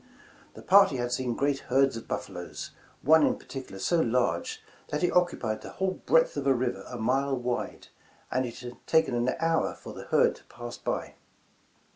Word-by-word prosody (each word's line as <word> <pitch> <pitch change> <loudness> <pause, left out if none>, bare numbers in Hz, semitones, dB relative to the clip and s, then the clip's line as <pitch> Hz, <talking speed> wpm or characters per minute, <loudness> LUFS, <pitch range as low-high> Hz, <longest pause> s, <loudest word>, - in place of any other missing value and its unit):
The - - -11
party 195 -8 +6
had 120 0 -2
seen 125 -1 -1
great 140 +1 +1
herds 135 0 +3
of 115 - -8
buffaloes, - - -5 0.3
one 160 +3 +6
in - - +2
particular 130 -8 -8
so 170 - +1
large 120 - 0 0.2
that 150 +4 -2
it 175 - +3
occupied 125 -11 +1
the - - -9
whole 190 0 -2
breadth 160 - +4
of 140 -1 -2
a 135 - +5
river 125 0 -2
a 125 - -6
mile 135 +4 +1
wide, 125 0 -3 0.4
and 130 +1 +1
it 120 -2 -6
had 120 0 -8
taken 160 -4 +3
an 120 +1 +1
hour 165 0 +1
for - - -10
the - - -9
herd - - +3
to - - -20
pass 120 0 -8
by. - - -3
130 Hz, 185 wpm, -28 LUFS, 120-160 Hz, 0.4 s, party